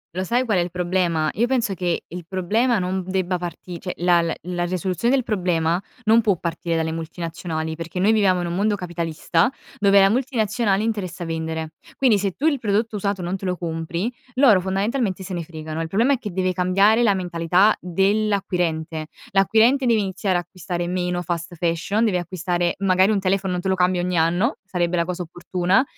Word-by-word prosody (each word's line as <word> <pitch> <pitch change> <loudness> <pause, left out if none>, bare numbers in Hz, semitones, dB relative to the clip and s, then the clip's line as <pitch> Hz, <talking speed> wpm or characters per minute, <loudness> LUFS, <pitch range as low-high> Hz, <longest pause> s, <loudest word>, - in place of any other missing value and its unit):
Lo 185 - -1
sai 240 +7 +1
qual 210 -6 +1
è - - +3
il 175 - -2
problema? 175 -3 0
Io 235 +4 +1
penso 240 -5 0
che 175 -2 -2
il 175 0 -8
problema 215 +7 +1
non 185 0 -1
debba 185 -1 -1
parti 175 0 -7
cioè 180 - -4
la 175 0 +4
la 165 -1 -2
la 175 0 -2
risoluzione 185 +6 -1
del 260 - +1
problema 175 -4 0 0.2
non 225 +1 +5
può 205 -5 +2
partire 170 0 -3
dalle 160 0 0
multinazionali, 165 -1 -4
perché 165 +2 -7
noi 200 +4 +4
viviamo 195 -5 +3
in - - -2
un 170 - -3
mondo 205 +3 +1
capitalista, 170 +1 0 0.3
dove 200 -1 +5
la 195 - +6
multinazionale 220 -4 0
interessa 190 -6 -3
vendere. 160 -1 -3 0.3
Quindi 240 -6 +4
se 195 -1 -1
tu 285 - -4
il 295 -4 +3
prodotto 220 0 0
usato 200 -2 -2
non 180 +3 -2
te 195 - -8
lo 180 -1 -1
compri, 170 +6 -3 0.2
loro 245 -8 +5
fondamentalmente 195 +2 -1
se 185 - -6
ne 175 - -2
fregano. 155 0 -6
Il 165 - -3
problema, 230 +10 +2
è 265 - -1
che 210 -5 -6
deve 185 0 0
cambiare 195 +5 +3
la 210 -4 +4
mentalità 180 +2 +2
dell'acquirente. 180 -4 0 0.2
L'acquirente 225 +7 +4
deve 230 -2 +4
iniziare 190 -1 -1
a - - 0
acquistare 175 0 -5
meno 180 0 -1
fast 170 +1 -4
fashion, 175 +6 0
deve 190 -5 +1
acquistare 175 -1 -1
magari 190 0 +3
un 210 - +2
telefono 190 0 0
non 180 - -2
te - - -2
lo 190 - +3
cambi 180 0 +2
ogni 180 +1 -1
anno, 175 - +2
sarebbe 180 -2 -1
la 170 -1 +1
cosa 180 +1 -3
opportuna, 180 +5 0
185 Hz, 195 wpm, -22 LUFS, 175-205 Hz, 0.3 s, la